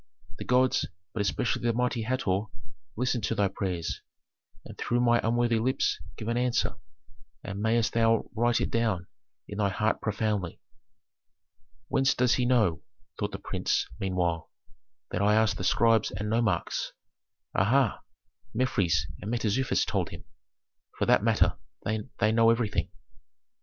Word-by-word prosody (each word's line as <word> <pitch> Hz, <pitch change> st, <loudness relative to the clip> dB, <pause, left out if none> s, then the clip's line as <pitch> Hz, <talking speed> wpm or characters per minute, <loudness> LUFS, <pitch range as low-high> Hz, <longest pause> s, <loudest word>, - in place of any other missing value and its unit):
The -, -, -5 dB
gods 125 Hz, +1 st, +3 dB, 0.3 s
but 110 Hz, -, -1 dB
especially 100 Hz, +3 st, 0 dB
the 120 Hz, -1 st, +1 dB
mighty 125 Hz, 0 st, 0 dB
Hator 110 Hz, -4 st, 0 dB, 0.5 s
listened 125 Hz, -1 st, 0 dB
to -, -, -1 dB
thy 100 Hz, -1 st, +2 dB
prayers, 85 Hz, -5 st, -3 dB, 0.6 s
and -, -, -10 dB
through 120 Hz, -, 0 dB
my 120 Hz, -1 st, +4 dB
unworthy 120 Hz, 0 st, +2 dB
lips 130 Hz, +4 st, +1 dB, 0.2 s
give 110 Hz, -, -6 dB
an 115 Hz, +1 st, 0 dB
answer, 125 Hz, -1 st, 0 dB, 0.7 s
and 100 Hz, -1 st, -5 dB
mayst 110 Hz, -1 st, +2 dB
thou 115 Hz, -1 st, +3 dB
write 120 Hz, +1 st, +2 dB
it -, -, -1 dB
down 110 Hz, -7 st, 0 dB, 0.4 s
in 100 Hz, -, -6 dB
thy 100 Hz, -1 st, +2 dB
heart 110 Hz, +3 st, 0 dB
profoundly." 105 Hz, -4 st, -1 dB, 1.3 s
"Whence 135 Hz, 0 st, +2 dB
does 125 Hz, -1 st, +3 dB
he 125 Hz, -1 st, +1 dB
know," 110 Hz, -11 st, +2 dB, 0.4 s
thought -, -, -1 dB
the -, -, -5 dB
prince, -, -, -1 dB
meanwhile, 90 Hz, -4 st, -1 dB, 0.6 s
"that 90 Hz, -, -1 dB
I 105 Hz, +1 st, +4 dB
asked 110 Hz, -3 st, +3 dB
the -, -, -4 dB
scribes 115 Hz, +3 st, +3 dB
and 105 Hz, +2 st, -4 dB
nomarchs? 110 Hz, -7 st, 0 dB, 0.6 s
Aha! 115 Hz, +4 st, +2 dB, 0.6 s
Mefres 100 Hz, -, +1 dB, 0.2 s
and 105 Hz, -, -5 dB
Mentezufis 120 Hz, +2 st, +1 dB
told -, -, -1 dB
him. -, -, -10 dB, 0.7 s
For -, -, +1 dB
that -, -, +4 dB
matter, -, -, +2 dB, 0.3 s
they 110 Hz, 0 st, -1 dB
know 115 Hz, 0 st, +5 dB
everything." 105 Hz, -7 st, +1 dB
110 Hz, 140 wpm, -28 LUFS, 100-120 Hz, 1.3 s, know